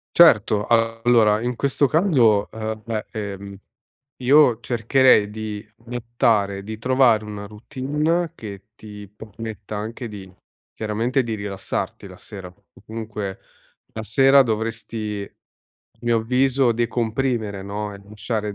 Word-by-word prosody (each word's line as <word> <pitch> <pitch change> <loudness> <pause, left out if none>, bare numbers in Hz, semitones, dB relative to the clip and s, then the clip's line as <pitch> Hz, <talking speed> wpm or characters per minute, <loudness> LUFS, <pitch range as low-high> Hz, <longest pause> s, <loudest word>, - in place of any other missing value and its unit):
Certo. 105 -10 +6
Allora 115 -1 +3
in 120 +1 -2
questo 140 +1 +1
caso, 125 - +3
ehm, 110 -1 -5
beh, 110 -2 -3
ehm, 100 -2 -6 0.7
io 130 -3 +5
cercherei 115 -2 +3
di 105 -1 -6
buttare 115 -4 0
di 110 +1 -6
trovare 125 -3 +3
una 105 -1 -7
routine 150 +9 -2
che 100 -1 -10
ti 105 -1 -11
permetta 110 0 -8
anche 115 +3 -5
di 95 -3 -10 0.4
chiaramente 115 +5 0
di 115 -2 -3
rilassarti 100 -1 -4
la - - -12
sera. 95 -3 -10
O 100 +2 -22
comunque 110 -3 -5 0.5
la 110 - -5
sera 135 +5 +5
dovresti 110 -2 -3
a - - -30
mio 120 -1 +2
avviso 130 +2 +2
decomprimere 115 -3 -1
no, 100 +1 -5
e 100 - -11
lasciare 105 -1 -3
110 Hz, 125 wpm, -22 LUFS, 105-120 Hz, 0.7 s, Certo